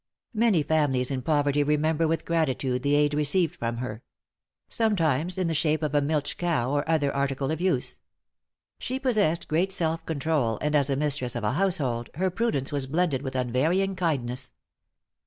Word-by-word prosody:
Many 215 -8 +3
families 145 -5 +1
in 130 -1 -2
poverty 145 0 +1
remember 150 +2 +1
with 165 +1 -1
gratitude 135 -6 0
the 140 +2 +2
aid 145 0 +2
received 150 +3 +2
from 115 0 -3
her; 120 -2 -5 0.7
sometimes 175 - +1
in 185 -2 0
the 165 - -1
shape 155 0 +1
of 150 -1 -1
a 145 - +3
milch 145 0 -1
cow, 155 -8 0
or 145 +2 -1
other 150 -4 +1
article 140 0 -1
of 160 +1 -3
use. 180 -9 +1 0.8
She 260 +1 -3
possessed 215 - +1
great 175 +5 +1
self 165 -3 0
control, 140 -7 0
and 150 0 -1
as 140 -1 +3
a 135 - +1
mistress 140 -4 -1
of 120 - -3
a 105 - +1
household, 145 -8 0
her 185 +3 0
prudence 185 - -1
was 140 -2 -2
blended 155 -2 0
with 130 -2 -5
unvarying 155 +11 +1
kindness. 135 -9 -2
150 Hz, 175 wpm, -26 LUFS, 135-165 Hz, 0.8 s, Many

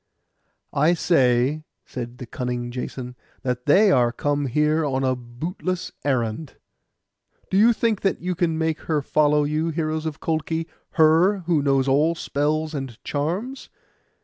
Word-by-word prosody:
'I 155 +5 +3
say,' 135 -2 +2 0.2
said 120 -1 -7
the 125 - -7
cunning 120 0 -4
Jason, 125 0 -6 0.3
'that 125 0 -3
they 200 +7 +6
are 120 -6 +3
come 145 +2 -1
here 150 +4 +2
on 135 -2 -1
a 130 -1 +1
bootless 160 +9 -5
errand. 130 +1 -1 1.0
Do 190 - +2
you 230 +3 +6
think 225 -2 0
that 195 - 0
you 180 +1 -2
can 170 -2 0
make 160 -1 -1
her 150 -3 +1
follow 150 0 +3
you, 155 +3 0
heroes 155 0 -2
of 155 - -2
the - - -26
Colchi—her, 165 +3 +1
who 165 -3 +2
knows 135 -1 +2
all 150 +5 +3
spells 155 +1 -1
and 135 -5 -5
charms? 185 - -3
150 Hz, 150 wpm, -23 LUFS, 130-165 Hz, 1.0 s, they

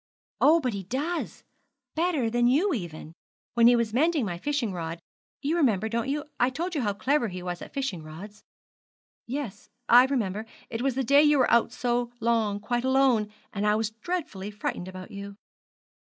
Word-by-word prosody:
'Oh, 320 +3 +6
but 255 -7 -1
he 200 - -3
does 280 - -3 0.5
better 320 -7 +1
than 240 +1 +2
you 325 +10 +3
even. 165 - -6 0.4
When 235 -1 +6
he 245 - +7
was 230 -2 0
mending 305 0 +2
my 175 -3 -4
fishing 275 -4 -1
rod 165 -1 -4 0.4
you 300 +4 +1
remember, 220 - +2
don't 230 +3 -2
you? 295 +1 -2
I 245 - +4
told 340 +7 -4
you 295 - 0
how 205 -4 0
clever 250 +6 +1
he 180 -2 -6
was 175 -1 -4
at - - -9
fishing 270 - -3
rods.' 185 +7 -10 0.9
'Yes, 250 -4 -5 0.2
I 245 +2 +8
remember 220 -5 -2 0.2
it 225 0 -3
was 265 -1 0
the 265 - 0
day 280 +4 +6
you 295 -1 +5
were 255 - +3
out 235 0 +4
so 240 -1 -1
long 220 -3 +1
quite 240 +3 -1
alone; 260 -5 +3 0.2
and 205 +1 -1
I 210 - +4
was 220 0 -1
dreadfully 225 - -4
frightened 205 -3 -4
about 185 0 -9
you.' 200 0 -8
235 Hz, 185 wpm, -27 LUFS, 205-275 Hz, 0.9 s, I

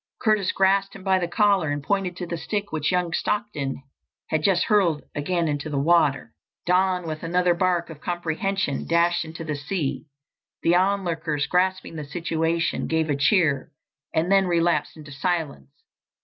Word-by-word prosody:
Curtis 215 -5 +2
grasped 195 +1 +2
him 195 - -10
by 190 -1 +3
the 175 - -1
collar 200 -4 +2
and 145 0 -2
pointed 190 0 -1
to 180 - -4
the 170 - -4
stick 205 +4 -3
which 155 +1 0
young 180 -2 0
Stockton 175 -13 -2 0.5
had 155 - 0
just 175 +1 +3
hurled 185 -8 +2
again 170 +3 -1
into 150 +1 -2
the 145 - -2
water. 145 -5 +2 0.3
Don, 180 0 +2
with 155 -1 -5
another 175 +1 +2
bark 175 -1 0
of 150 - -12
comprehension, 175 -1 -2
dashed 170 +1 +2
into 165 +1 -8
the 155 -2 -3
sea. 150 0 -3 0.6
The 170 - +4
onlookers, 170 -6 0
grasping 185 -2 0
the 150 - -4
situation, 165 +2 -1
gave 160 -1 0
a - - +1
cheer 145 -1 +2 0.4
and 165 +3 0
then 195 -1 +4
relapsed 170 -1 +1
into 150 -2 -11
silence. 145 - -2
170 Hz, 165 wpm, -24 LUFS, 155-185 Hz, 0.6 s, The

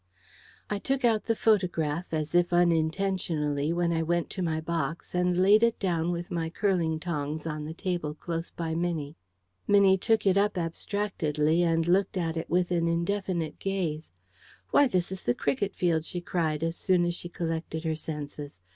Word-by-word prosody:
I 205 - -2
took 270 +5 0
out 225 -3 +2
the 225 - +1
photograph, 175 -7 +1
as 155 -1 -2
if 175 0 +3
unintentionally, 165 -3 +1
when 170 0 +1
I 165 - +1
went 170 +1 0
to 190 - -4
my 160 -3 0
box, 165 0 -3
and 180 0 +1
laid 200 +4 +6
it 235 0 +3
down 175 -3 0
with 175 0 -4
my 165 -2 -1
curling 170 -3 0
tongs 155 -2 -3
on 150 -2 -4
the 160 +1 -6
table 175 -5 -3
close 165 +1 -4
by 165 -1 -4
Minnie. 165 -3 -2 0.5
Minnie 200 -2 +5
took 225 +2 +2
it 195 0 +4
up 205 0 +2
abstractedly 165 -3 0
and 165 -1 +2
looked 190 +2 +2
at 165 -2 -1
it 165 - -4
with 180 +1 +1
an 170 -1 +1
indefinite 170 -1 -1
gaze. 175 -6 -2 0.6
"Why, 285 - +6
this 180 -6 0
is 190 - -5
the 120 - 0
cricket 145 +8 -1
field!" 165 -3 +1
she 175 - -5
cried, 165 -3 -1
as 165 0 -1
soon 180 -3 +2
as 175 - 0
she 175 0 -7
collected 165 -1 -3
her 160 -1 0
senses. 150 - -7
170 Hz, 180 wpm, -28 LUFS, 160-185 Hz, 0.6 s, laid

